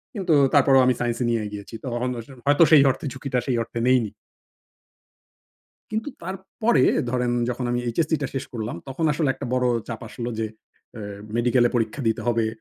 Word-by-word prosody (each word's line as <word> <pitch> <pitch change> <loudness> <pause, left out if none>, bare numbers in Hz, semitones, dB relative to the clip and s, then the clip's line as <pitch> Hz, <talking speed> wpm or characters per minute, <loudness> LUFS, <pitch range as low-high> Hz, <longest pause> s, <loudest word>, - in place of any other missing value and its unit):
কিন্তু 185 -6 +2 0.2
তারপরেও 135 -1 +6
আমি 130 - +4
সাইন্সই 120 0 -1
নিয়ে 115 -1 +1
এগিয়েছি। 105 +2 -8
তখন 125 0 -2
আস 115 - -8 0.2
হয়তো 145 +3 +5
সেই 150 -3 +9
অর্থে 140 - -7
ঝুঁকিটা 130 -1 -2
সেই 130 - +1
অর্থে 115 +1 -6
নেইনি। 125 -5 +3 1.8
কিন্তু 220 +5 -2
তারপরে 190 - 0 0.3
ধরেন, 125 -1 0 0.2
যখন 125 +1 -2
আমি 120 0 0
এইচএসসিটা 155 +3 0
শেষ 135 - -2
করলাম, 110 -3 -4
তখন 135 +5 -3
আসলে 150 -2 0
একটা 135 0 -6
বড় 125 0 +2 0.2
চাপ 115 -2 -5
আসলো 120 +1 -5
যে, 110 - 0 0.5
অ্যা 110 - -7 0.3
"মেডিকেলে 120 0 +3
পরীক্ষা 115 +4 -1
দিতে 110 0 -1
হবে। 115 -2 +2
125 Hz, 165 wpm, -24 LUFS, 120-145 Hz, 1.8 s, সেই